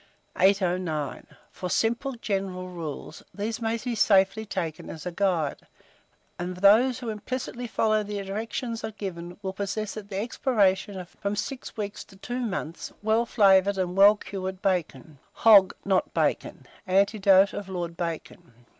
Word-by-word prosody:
809. 180 -6 +1 0.2
FOR 180 - -5
SIMPLE 235 +8 0
GENERAL 195 -5 -3
RULES; 165 -5 -7
these 220 +3 -3
may 225 0 0
be 240 +2 -4
safely 205 0 +3
taken 165 -5 -4
as 155 - -8
a 180 - -3
guide; 170 -5 0 0.8
and 180 +1 -4
those 220 +7 +5
who 245 -3 -5
implicitly 245 +2 -4
follow 215 -1 +1
the 205 -1 -4
directions 225 +3 -4
given, 175 -3 -6
will 190 0 -3
possess 200 +2 -3
at 205 -1 -8
the 195 - -4
expiration 205 -4 +1
of 180 -1 -9
from 200 +1 -1
6 250 +4 -5
weeks 205 -1 -4
to 195 - -18
2 245 +6 -5
months 195 -8 -4
well 220 +2 +2
flavoured 200 -3 +4
and 180 -1 -1
well 200 +2 +7
cured 190 -2 -6
bacon. 160 -7 -2
HOG 205 -4 +6
NOT 190 -2 +1
BACON. - - -1 0.2
ANECDOTE 195 0 +4
OF 200 -2 -6
LORD 175 -2 -4
BACON. 160 -8 -6
195 Hz, 145 wpm, -26 LUFS, 180-220 Hz, 0.8 s, well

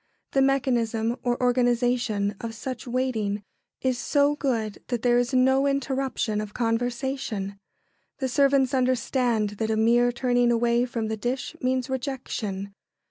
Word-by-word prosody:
The 270 - +3
mechanism 240 -4 +1
or 245 -1 0
organisation 245 -4 +1
of 225 -1 -5
such 255 0 -6
waiting 225 -5 -1 0.4
is 255 -2 0
so 285 +2 +2
good 230 -8 -2
that 245 -2 -2
there 240 -1 +4
is 245 0 0
no 265 +1 +3
interruption 265 -5 -1
of 210 -1 -8
conversation. 235 -3 -2 0.6
The 265 - -1
servants 275 0 +3
understand 250 -4 +1
that 220 -1 0
a 220 - +1
mere 240 +2 +4
turning 245 0 +2
away 235 +1 +2
from 230 -3 -3
the 220 0 -3
dish 255 +7 -3
means 255 -1 0
rejection. 245 -7 -4
245 Hz, 135 wpm, -26 LUFS, 225-260 Hz, 0.6 s, there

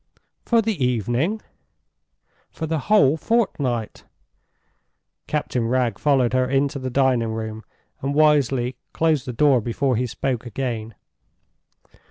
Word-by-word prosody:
"For 230 -1 +3
the 205 -10 -1
evening?" 125 - 0 1.1
"For 160 - -5
the 160 0 -1
whole 155 -8 +5
fortnight." 140 - -1 1.2
Captain 125 -6 -1
Wragge 120 -3 0
followed 135 -5 +2
her 130 0 +2
into 140 +2 0
the 130 -1 -4
dining 125 -4 +1
room, 110 0 -5 0.4
and 140 +1 -2
wisely 135 -5 +2 0.2
closed 155 -4 +1
the - - -2
door 130 0 +3
before 125 +3 0
he 125 +3 0
spoke 125 0 -3
again. 115 -2 -4
130 Hz, 120 wpm, -22 LUFS, 120-150 Hz, 1.2 s, whole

